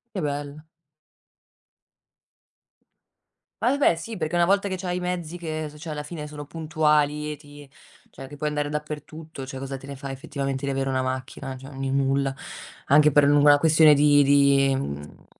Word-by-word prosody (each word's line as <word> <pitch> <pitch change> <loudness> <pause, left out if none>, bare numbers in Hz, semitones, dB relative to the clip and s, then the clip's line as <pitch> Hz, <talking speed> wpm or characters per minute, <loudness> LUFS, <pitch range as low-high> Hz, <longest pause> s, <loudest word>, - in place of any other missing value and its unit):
Che 185 - -2
bello. 145 +1 -4 3.0
Ma 255 - +3
e - - -1
beh, 175 - +3
sì, 225 +7 -7
perché 175 -2 -3
una 170 0 +4
volta 200 +1 +2
che 185 - -3
c'hai 180 -1 -3
i - - -2
mezzi 175 -1 -4
che 155 -2 -4
s 150 - -16
cioè, 160 -2 -6
alla 150 0 -4
fine 150 -1 -7
sono 150 -1 -8
puntuali 150 -1 0
e - - -7
ti 145 -1 -15 0.4
cioè, 135 - -10
che 145 - -11
puoi 150 - -2
andare 150 -1 -2
dappertutto, 150 -1 -7
cioè, 130 0 -7
cosa 135 0 -5
te 135 - -10
ne 140 -1 -8
fai 135 -1 -6
effettivamente 135 0 -4
di 140 - -1
avere 135 0 -2
una 130 -1 0
macchina? 130 +1 -5
Cioè, 135 +2 -11
n 135 - -5
il 135 - -1
nulla. 135 0 +1 0.5
Anche 150 +1 +5
per 145 0 +5
l 145 - +4
una 145 0 +6
questione 155 0 +6
di 145 0 +5
di, 140 -1 +4
mhmm, 75 - -6
145 Hz, 190 wpm, -24 LUFS, 135-155 Hz, 3.0 s, una